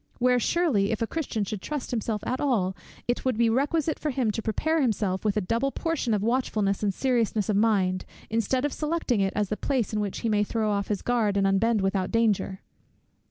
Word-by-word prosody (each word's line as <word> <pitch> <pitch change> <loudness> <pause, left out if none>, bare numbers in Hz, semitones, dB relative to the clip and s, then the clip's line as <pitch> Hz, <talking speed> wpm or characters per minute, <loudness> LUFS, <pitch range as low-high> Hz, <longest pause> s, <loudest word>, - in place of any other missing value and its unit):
where 250 0 +3
surely, 250 - +2
if 225 - -1
a - - +2
Christian 250 -6 -2
should 200 0 -4
trust 295 -4 -4
himself 220 -3 -2
at 255 - -1
all, 205 -10 +1 0.3
it 240 - 0
would 255 -4 0
be 230 -1 +3
requisite 295 +5 0
for 305 - -2
him 250 -5 0
to 225 - -3
prepare 315 +9 0
himself 205 -6 0
with 210 -1 +1
a - - +2
double 230 +8 0
portion 325 -8 -1
of 205 -2 +1
watchfulness 215 -4 0
and 205 -2 +1
seriousness 225 -2 0
of 210 - +2
mind, 195 -4 +2 0.2
instead 230 +4 0
of 290 - -1
selecting 300 -8 0
it 195 0 +1
as 205 -2 0
the 215 - 0
place 255 -6 -1
in 210 - 0
which 205 -2 -3
he - - -1
may 210 -2 +2
throw 215 0 -1
off 200 -1 -1
his 205 -2 -2
guard, 225 -5 +1
and 195 - +2
unbend 205 +3 +2
without 190 -1 0
danger! 215 -4 +1
225 Hz, 215 wpm, -26 LUFS, 200-255 Hz, 0.3 s, where